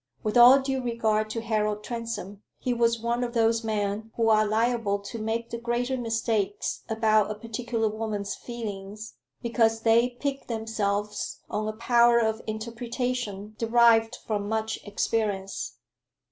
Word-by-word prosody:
With 215 +1 -1
all 245 +3 +9
due 265 -1 -2
regard 220 -3 0
to 230 +1 -3
Harold 210 -2 -1
Transome, 220 -4 -5 0.2
he 250 - -1
was 235 -1 +2
one 235 +2 -1
of 240 0 -4
those 230 0 +3
men 215 0 -2
who 225 -1 +2
are 215 -1 +4
liable 225 -1 +1
to 200 +3 -8
make 225 +2 -2
the 235 - -4
greater 240 +2 -1
mistakes 225 -4 -1
about 215 -2 +3
a 215 - -3
particular 230 +1 -2
woman's 215 -2 -3
feelings, 215 -2 -7 0.3
because 225 -1 +2
they 230 +2 +4
pique 280 -1 -3
themselves 215 -3 -2
on 215 0 -1
a 215 - -2
power 235 +1 +4
of 220 -1 +1
interpretation 230 -1 -3
derived 230 0 +4
from 205 -2 -2
much 220 0 -1
experience. 195 - -2
225 Hz, 145 wpm, -27 LUFS, 215-235 Hz, 0.3 s, all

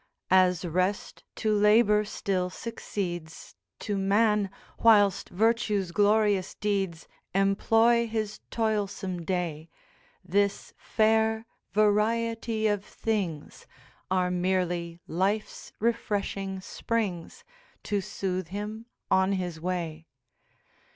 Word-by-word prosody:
'As 185 -1 +4
rest 185 +4 -1
to 215 -1 0
labour 210 0 +5
still 185 -3 -2
succeeds, 180 -6 -6 0.3
To 205 -2 -2
man, 205 +1 +2 0.3
whilst 205 -4 +4
virtue's 210 -2 +1
glorious 205 0 +2
deeds 195 -5 -2 0.3
Employ 225 +4 +3
his 215 -1 -3
toilsome 205 -5 -2
day, 165 -3 -3 0.6
This 200 +2 0
fair 220 0 +1 0.3
variety 220 +2 +1
of 205 -2 +1
things 195 -10 -4 0.4
Are 180 -1 +1
merely 175 -2 -1
life's 195 +6 -2
refreshing 200 -4 -1
springs, 210 - -3 0.4
To 205 -2 -1
sooth 185 -2 -3
him 210 +4 -6 0.2
on 190 +1 +3
his 175 -4 -3
way. 165 -3 -3
200 Hz, 90 wpm, -28 LUFS, 180-215 Hz, 0.6 s, labour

